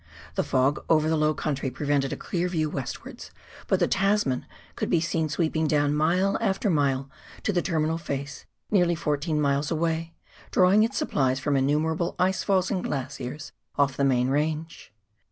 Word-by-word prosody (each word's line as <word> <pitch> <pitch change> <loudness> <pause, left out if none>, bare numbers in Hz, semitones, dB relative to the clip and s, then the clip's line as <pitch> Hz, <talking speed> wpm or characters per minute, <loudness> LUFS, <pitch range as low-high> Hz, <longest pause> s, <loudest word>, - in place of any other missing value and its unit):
The - - 0
fog 135 +3 +1
over 155 -1 +4
the 160 - +2
low 155 0 +2
country 140 -3 -2
prevented 140 0 0
a - - -3
clear 180 0 -2
view 160 -4 -1
westwards, 135 -3 -6 0.4
but - - +2
the - - +3
Tasman 195 -9 +1 0.3
could - - -2
be 170 - +3
seen 165 -1 -1
sweeping 160 0 0
down 145 -1 +2
mile 175 +6 +2
after 200 -1 +1
mile 140 -3 +1 0.4
to 205 - 0
the 175 - +2
terminal 160 -2 0
face 140 -2 -5 0.2
nearly 175 -4 +3
fourteen 150 -1 -1
miles 145 0 +1
away, 165 0 -1 0.3
drawing 190 +3 +5
its 225 - +1
supplies 130 -1 +1
from 145 +1 0
innumerable 155 +5 +1
ice 190 +1 +1
falls 190 -2 +1
and 185 - -1
glaciers 140 +1 -5 0.2
off 140 -2 +2
the 140 - 0
main 130 -2 +2
range. 155 +2 -2
155 Hz, 170 wpm, -26 LUFS, 140-170 Hz, 0.4 s, drawing